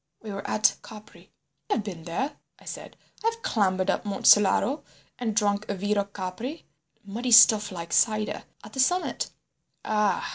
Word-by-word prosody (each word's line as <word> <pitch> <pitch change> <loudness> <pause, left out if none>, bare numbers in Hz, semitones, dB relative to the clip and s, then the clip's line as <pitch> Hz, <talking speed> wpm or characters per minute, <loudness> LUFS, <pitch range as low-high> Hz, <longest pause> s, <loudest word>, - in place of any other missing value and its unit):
We 215 - -6
were 195 0 -6
at 215 0 +3
Capri—" 215 -1 -14 0.4
"I - - +2
have 225 - -1
been 175 -6 -8
there," 260 - -3 0.2
I - - -20
said. - - -8 0.3
"I 455 - +4
have 460 0 -13
clambered 185 -4 +1
up - - -2
Monte 200 -2 -5
Solaro 210 +8 +5 0.4
and 225 -4 -2
drunk 205 -1 +1
vero 205 +1 -1
Capri—muddy 200 - -7
stuff 220 -2 +7
like 170 -2 -6
cider—at 215 -1 -1
the 265 - -6
summit." 355 +8 +1 0.6
"Ah!" 210 -2 +1
210 Hz, 150 wpm, -26 LUFS, 195-230 Hz, 0.6 s, stuff